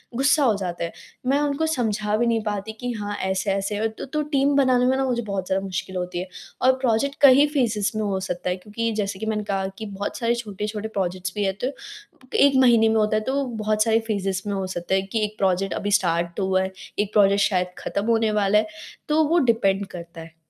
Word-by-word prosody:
गुस्सा 280 +3 +3
हो 230 -5 +4
जाते 175 -3 -4
हैं, 170 - -3 0.4
मैं 280 +2 +3
उनको 295 +2 0
समझा 215 -7 0
भी 240 - +1
नहीं 230 -1 +1
पाती 210 0 -3
कि 245 0 -3
हाँ, 205 -3 -4
ऐसे-ऐसे 195 +1 -1
है 220 +2 0
तो 220 - -8
तो 300 +3 -2
टीम 275 +1 +3
बनाने 255 -3 +4
में 260 +1 +3
ना 270 - +1
मुझे 240 -2 0
बहुत 195 -4 -4
ज़्यादा 190 +1 0
मुश्किल 190 0 -4
होती 180 0 -3
है। 185 - -4 0.3
और 260 - +6
प्रोजेक्ट 265 +3 +1
कई 280 +1 +8
फेजेस 220 -6 +1
में 215 - -1
हो 195 -2 -1
सकता 180 -1 -3
है 180 - 0
क्योंकि 215 +4 -3
जैसे 195 -1 -4
कि 220 - -4
मैंने 215 -1 -1
कहा 195 -1 -1
कि 220 - -6
बहुत 200 -1 -5
सारे 235 0 +1
छोटे-छोटे 210 -1 -4
प्रोजेक्ट्स 185 -3 -3
भी 205 - 0
है 195 - +1
तो 270 - -1 0.7
1 280 -1 +5
महीने 230 -3 +5
में 220 - +1
होता 215 0 +2
है। - - 0
तो 275 +4 0 0.2
बहुत 215 0 +2
सारे 225 0 +3
फेजेस 195 -3 -1
में 205 - -1
हो 195 -1 -2
सकता 180 0 -2
है 190 - +2
कि 205 +3 -2
1 210 +1 -8
प्रोजेक्ट 190 0 +1
अभी 205 - -2
स्टार्ट 170 -3 +1
तो 195 - 0
हुआ 190 0 +2
है, 190 0 -2 0.3
1 205 0 -1
प्रोजेक्ट 200 -1 +4
शायद 180 -3 +1
खत्म 200 +1 -3
होने 225 -2 +2
वाला 200 +1 +3
है, 215 0 +2 0.4
तो 315 +1 +4
वो 340 +2 +3
डिपेंड 200 -3 +2
करता 170 -1 -9
है। 160 0 -13
210 Hz, 235 wpm, -23 LUFS, 190-235 Hz, 0.7 s, कई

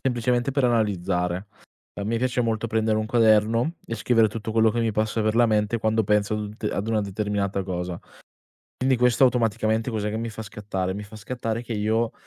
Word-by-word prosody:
semplicemente 125 +1 0
per 140 +1 +1
analizzare. 95 -5 0 0.5
A - - -5
me 115 +2 0
piace 125 +1 0
molto 115 -1 0
prendere 110 -1 +1
un 110 - -2
quaderno 115 +5 +3
e 115 - -3
scrivere 115 0 +3
tutto 110 0 -5
quello 110 0 +4
che 120 - -1
mi 115 -1 +1
passa 110 +1 0
per 110 +1 +1
la 120 - +5
mente, 105 +1 +1
quando 110 0 +1
penso 105 +1 +1
ad 105 - -2
un 105 0 -6
te 105 - -2
ad 105 +3 -3
una 110 -1 +1
determinata 100 -1 -2
cosa. 90 -2 -4 0.8
Quindi 130 0 +2
questo 125 +1 +4
automaticamente 115 -2 +1
cos'è 105 -2 -2
che 110 - -3
mi 115 - -3
fa 110 0 -7
scattare? 95 -3 -4
Mi 105 - -5
fa 105 +1 -11
scattare 115 +1 -4
che 115 - -5
io 110 +2 0
110 Hz, 205 wpm, -24 LUFS, 105-115 Hz, 0.8 s, la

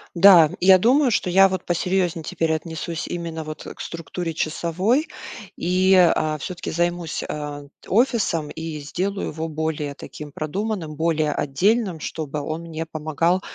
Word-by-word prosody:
Да, 170 -4 +8
я 190 +1 +7
думаю, 255 +8 +4
что 190 -5 0
я 195 +2 +6
вот 185 0 -4
посерьезнее 175 -1 0
теперь 160 +1 -1
отнесусь 160 +1 -4
именно 165 -2 -4
вот 155 0 -7
к - - -9
структуре 165 0 -5
часовой. 185 - 0 0.5
И, 185 +2 +3
а, 155 -4 +4
всё-таки 175 +5 -6
займусь, 175 0 -1
э, 145 -1 -5
т - - -16
офисом 205 - +1
и 160 -1 -5
сделаю 185 +7 -3
его 160 +1 -4
более 155 -2 -3
таким 145 +3 -9
продуманным, 165 +1 -3
более 160 -1 +1
отдельным. 185 - +1
Чтобы 150 -1 -4
он 155 +3 -4
мне 165 -1 -5
помогал 160 +3 0
165 Hz, 145 wpm, -23 LUFS, 155-185 Hz, 0.5 s, Да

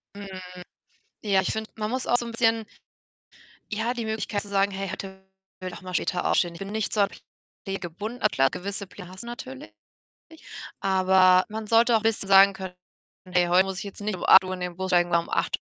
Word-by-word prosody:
Mhm, 200 -1 -8 1.0
ja, 195 -2 +3
ich 185 - -1
finde, 220 0 -4
man 215 0 -3
muss 255 0 -2
auch 245 - +3
so 240 - -3
'n 235 - -6
bisschen 225 -1 +1 1.1
ja, 225 +3 -1
die 235 -3 -4
Möglichkeit 220 -1 -2
zu 205 - -12
sagen: 200 0 +1
„Hey, 195 0 -4
heute 190 -1 -7 0.4
will 185 - -5
ich - - -8
auch - - -14
mal 185 -1 -8
später 180 0 -1
aufstehen.“ 175 -2 +2
Ich 170 - -11
bin 195 +1 -6
nicht 220 -1 -2
so 210 - +2
an 200 - +3 0.6
Pläne 195 0 -3
gebunden. 205 +8 -6
Klar, 135 0 +3
gewisse 200 +2 -5
Pläne 185 -2 -11
hast 185 +3 -9
du 235 - -10
natürlich, 130 - -8 1.1
aber 185 -1 +4
man 215 0 -6
sollte 230 +2 +4
auch - - +4
'n - - -14
bisschen 220 -3 0
sagen 195 0 +8
können: 190 -1 -8 0.5
„Hey, 180 -1 +2
heute 180 +2 +4
muss 190 -1 -4
ich - - -5
jetzt 200 0 -9
nicht 210 -1 -2
um - - -5
8:00 185 -1 +7
in 180 - -6
den 180 0 -4
Bus 190 0 -3
steigen 175 -1 +3
oder 170 - +3
um - - -12
8:00 - - 0
195 Hz, 225 wpm, -26 LUFS, 185-215 Hz, 1.1 s, sagen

